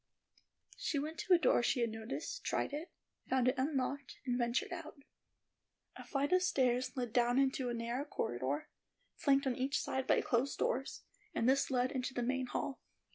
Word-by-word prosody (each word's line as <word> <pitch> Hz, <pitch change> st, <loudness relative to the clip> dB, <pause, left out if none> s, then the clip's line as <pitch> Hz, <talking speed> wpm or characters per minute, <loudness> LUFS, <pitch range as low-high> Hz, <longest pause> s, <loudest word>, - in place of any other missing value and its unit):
She 295 Hz, -, -1 dB
went 310 Hz, +3 st, -3 dB
to 375 Hz, -, +3 dB
a -, -, +6 dB
door 285 Hz, -6 st, +4 dB
she 245 Hz, +1 st, +1 dB
had 230 Hz, -1 st, +1 dB
noticed, 225 Hz, -, -5 dB
tried -, -, -1 dB
it, 305 Hz, +4 st, -5 dB, 0.4 s
found 255 Hz, -1 st, +3 dB
it -, -, +2 dB
unlocked, 275 Hz, 0 st, -1 dB
and 245 Hz, -2 st, +1 dB
ventured 240 Hz, 0 st, 0 dB
out. -, -, -7 dB, 1.0 s
A -, -, -9 dB
flight 285 Hz, +3 st, 0 dB
of 365 Hz, -, +5 dB
stairs 255 Hz, -5 st, +1 dB
led 245 Hz, -3 st, -2 dB
down 245 Hz, 0 st, +3 dB
into 265 Hz, -2 st, +2 dB
a -, -, -1 dB
narrow 235 Hz, +4 st, -2 dB
corridor, 130 Hz, -, -2 dB, 0.5 s
flanked 275 Hz, -1 st, +3 dB
on 260 Hz, -2 st, +1 dB
each 265 Hz, +3 st, 0 dB
side 265 Hz, 0 st, -2 dB
by -, -, +5 dB
closed 250 Hz, +3 st, 0 dB
doors, 265 Hz, +3 st, -1 dB, 0.3 s
and 230 Hz, -, +2 dB
this 270 Hz, +1 st, +3 dB
led 255 Hz, -1 st, +1 dB
into 255 Hz, -1 st, -3 dB
the 245 Hz, -, 0 dB
main 260 Hz, +1 st, 0 dB
hall. 270 Hz, +2 st, -3 dB
260 Hz, 185 wpm, -35 LUFS, 245-275 Hz, 1.0 s, a